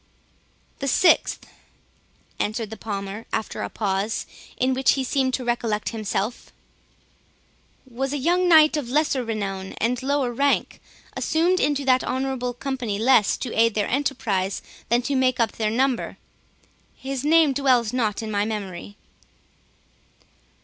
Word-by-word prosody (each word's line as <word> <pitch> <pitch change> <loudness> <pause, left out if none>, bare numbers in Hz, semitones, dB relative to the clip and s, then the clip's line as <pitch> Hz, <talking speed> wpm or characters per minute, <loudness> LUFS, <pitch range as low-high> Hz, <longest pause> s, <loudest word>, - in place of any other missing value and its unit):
"The 275 - -3
sixth," 330 +6 +3 0.9
said 215 0 -2
the - - -5
Palmer, 200 0 -6
after 220 - -3
a - - -3
pause, 200 +1 -2 0.3
in 260 +1 +1
which 260 -1 +3
he 270 - -1
seemed 260 0 0
to 255 - -5
recollect 230 -3 -1
himself, 220 0 -3 1.3
"was 260 +2 -4
a 290 - -1
young 350 +6 +2
knight 315 -1 +7
of 285 -6 -3
lesser 280 -1 +1
renown 195 -4 -4
and 240 +3 -1
lower 270 -2 0
rank, 280 +3 0 0.3
assumed 345 +3 +1
into 285 -1 0
that 255 -1 +3
honourable 260 -2 -2
company, 250 -6 -3
less 225 -2 +4
to 250 - -5
aid 230 -1 +3
their 210 -1 0
enterprise 225 -8 -1 0.3
than 240 +2 +2
to 285 - -2
make 255 -1 +2
up 230 -2 +2
their 215 -1 -1
number—his 265 +2 -5
name 310 -1 +4
dwells 250 -4 +2
not 225 -4 -1
in 220 - -5
my 205 -1 +1
memory." 205 -3 -5
245 Hz, 135 wpm, -23 LUFS, 215-270 Hz, 1.3 s, knight